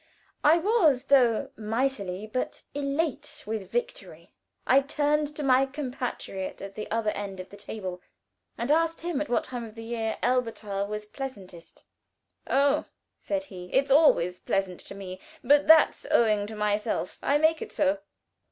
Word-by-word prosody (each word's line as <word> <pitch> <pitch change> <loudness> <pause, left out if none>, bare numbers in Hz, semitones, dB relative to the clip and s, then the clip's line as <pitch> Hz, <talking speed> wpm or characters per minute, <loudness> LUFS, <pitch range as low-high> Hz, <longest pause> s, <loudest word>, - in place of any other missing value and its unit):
I 310 +3 +6
was, 335 - +3
though, 255 -5 +3
mightily; 215 -3 -2
but, 225 +4 -4
elate 290 +1 -2
with 215 -2 -4
victory, 485 +1 -5 0.3
I 270 +2 +5
turned 295 +2 +1
to 300 - -4
my 265 0 +4
compatriot 250 -8 -5
at 195 0 -8
the 215 - -6
other 220 -1 0
end 195 -2 -6
of 185 - -8
the - - -10
table, 190 -3 -6 0.6
and 240 +5 -1
asked 330 +1 +2
him 335 -4 -2
at 300 - -3
what 245 - +1
time 245 -2 -6
of 220 -1 -10
the 225 - -8
year 225 -1 -2
Elberthal 225 -5 0
was 210 0 -5
pleasantest. 200 -9 -9 0.7
"Oh," 280 +2 +3 0.3
said 295 -1 -2
he, 180 -9 -10
"it's 270 +1 +2
always 180 - +4
pleasant 195 -2 -1
to - - -9
me, 185 -2 -8 0.2
but 290 +3 +4
that's 320 0 +6
owing 210 -3 +3
to 220 - -8
myself. 210 +1 -1
I 285 - +3
make 315 +1 +3
it - - -6
so." 295 0 +1
245 Hz, 160 wpm, -27 LUFS, 210-290 Hz, 0.7 s, I